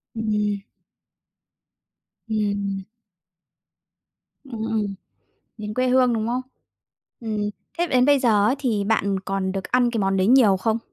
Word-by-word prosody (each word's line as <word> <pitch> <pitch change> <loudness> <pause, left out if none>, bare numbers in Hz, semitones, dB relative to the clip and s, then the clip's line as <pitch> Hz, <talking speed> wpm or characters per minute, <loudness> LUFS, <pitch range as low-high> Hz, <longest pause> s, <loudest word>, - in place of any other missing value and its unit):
Ừm. 210 -2 -1 1.7
Ừm. 200 -2 -1 1.6
Ừm, 235 -6 -6
ừm, 215 -3 -2 0.6
đến 210 0 -5
quê 255 +2 +1
hương, 250 -1 +4
đúng 220 -1 -1
không? 245 +2 -1 0.8
Ừm, 215 -3 -2 0.3
thế 345 - +2
đến 255 -6 +3
bây 285 +1 +5
giờ 215 -5 +3
ấy 240 - +3
thì 225 -7 0
bạn 200 -2 +1
còn 195 -1 -2
được 195 0 -4
ăn 245 -1 +2
cái 235 - -2
món 195 0 +1
đấy 190 0 +2
nhiều 230 -5 +5
không? 220 +4 0
215 Hz, 135 wpm, -23 LUFS, 200-245 Hz, 1.7 s, bây